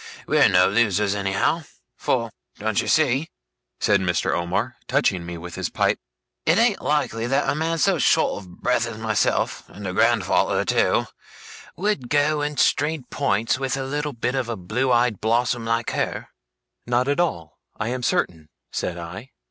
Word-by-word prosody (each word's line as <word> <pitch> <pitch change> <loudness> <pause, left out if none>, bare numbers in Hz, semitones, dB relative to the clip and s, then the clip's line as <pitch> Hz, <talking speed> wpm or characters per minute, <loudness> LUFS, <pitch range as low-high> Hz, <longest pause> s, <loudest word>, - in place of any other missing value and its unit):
We're - - +4
no 90 0 +5
losers, 105 -2 +2
anyhow." 100 - 0 0.3
For - - -1 0.3
don't 110 -1 0
you - - -6
see,' 150 0 +2 0.5
said - - +3
Mr. 90 -3 0
Omer, 85 +1 -1
touching 90 -3 +1
me 85 0 -5
with 85 +1 -8
his - - -3
pipe, - - +1 0.4
'it 165 +3 +3
ain't 230 -2 +3
likely 135 -6 0
that 135 +2 +1
a - - +2
man 160 +2 -1
so 180 +1 +2
short - - +2
of 90 -2 -15
breath 125 -1 +1
as 115 -2 -7
myself, 110 -1 0
and 100 +1 -10
a 90 - -3
grandfather - - +2
too, - - +2 0.7
would 180 -10 -1
go 145 +1 +2
and 150 0 -2
strain 150 0 +2
points 115 -3 0
with 135 0 -1
a 135 - -2
little 145 +2 -3
bit 125 +1 -2
of 130 -3 -1
a 115 - -3
blue 110 +9 -1
eyed 120 -3 +2
blossom, 120 +1 +1
like 115 0 0
her?' - - -2 0.6
'Not 125 +2 +1
at 145 +3 +1
all, 85 - -2 0.2
I 110 - -1
am 125 +1 -3
certain,' 80 -9 -1 0.2
said 90 - -3
I. 90 +9 -8
120 Hz, 170 wpm, -23 LUFS, 100-145 Hz, 0.7 s, no